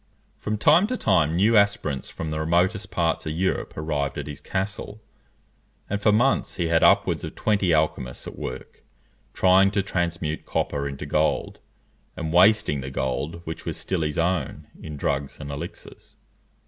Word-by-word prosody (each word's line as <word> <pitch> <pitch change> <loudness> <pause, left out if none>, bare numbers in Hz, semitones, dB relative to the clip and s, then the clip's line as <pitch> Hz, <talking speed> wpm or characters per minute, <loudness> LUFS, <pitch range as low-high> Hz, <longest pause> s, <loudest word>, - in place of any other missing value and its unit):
From 105 0 -2
time 160 - +5
to 255 +2 -2
time 85 - +2
new 105 +6 +3
aspirants 100 -10 +1
from 80 -1 -5
the 75 - -2
remotest 90 +6 +1
parts 80 -2 -1
of 80 - -2
Europe 95 +4 -2
arrived 75 -2 -2
at 70 - -4
his 75 -1 -8
castle, 100 +2 -4 0.9
and 100 0 -2
for 105 - +4
months 120 +6 +2
he 85 -2 -1
had 80 0 +3
upwards - - +4
of - - -6
twenty 100 -4 +1
alchymists 75 -6 0
at - - -8
work, - - -7 0.5
trying 95 +1 +5
to 100 -1 0
transmute 85 -4 -2
copper 70 -1 -2
into 70 +2 -6
gold; 75 +2 0 0.6
and 80 0 -3
wasting 90 -6 +4
the 65 - -5
gold 70 +5 -3
which 80 - -6
was - - -3
still 95 -3 -2
his 75 -1 -2
own 90 +2 -1 0.2
in 75 -2 -7
drugs 70 0 -2
and 70 -1 -6
elixirs. 80 +5 -9
85 Hz, 165 wpm, -24 LUFS, 75-100 Hz, 0.9 s, time